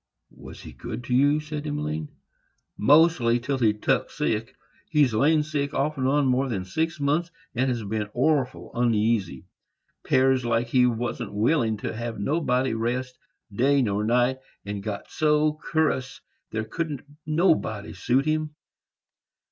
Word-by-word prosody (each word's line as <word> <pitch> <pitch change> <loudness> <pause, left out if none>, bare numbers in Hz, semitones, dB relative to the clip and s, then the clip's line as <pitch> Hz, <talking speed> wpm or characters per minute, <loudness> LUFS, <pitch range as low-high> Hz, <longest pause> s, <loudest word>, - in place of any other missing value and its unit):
"Was - - -11
he - - -10
good 120 0 -7
to 125 - -3
you?" 145 +3 +4
said 150 0 -6
Emmeline. 80 - -3 0.7
"Mostly, 140 -3 +4
till 130 +2 -2
he 115 -3 +4
tuk 105 0 0
sick. 110 +2 -2 0.3
He's 145 -7 +3
lain 150 +7 +3
sick, 145 -2 -3
off 150 +2 0
and 130 -2 -1
on, 145 +1 +2
more 130 +1 +1
than 95 -6 -3
six 160 - -2
months, 150 +5 +1 0.2
and 120 -3 -1
been 105 0 -2
orful 130 +1 0
oneasy. 110 - 0 0.6
'Pears 130 -1 +3
like 115 0 0
he 125 0 +4
warn't 120 -1 -3
willin' 110 +1 +1
to - - -4
have 115 -1 -5
nobody 130 0 0
rest, 125 +3 -2 0.3
day 135 +5 +3
nor 105 -2 0
night; 125 +3 +2 0.3
and 100 0 -4
got 100 0 -6
so 150 0 +2
cur'ous, 135 -5 -1 0.3
there 110 0 -2
couldn't 150 +3 -4 0.2
nobody 155 - +1
suit 135 +3 +1
him. 155 -1 -1
125 Hz, 145 wpm, -25 LUFS, 115-150 Hz, 0.7 s, you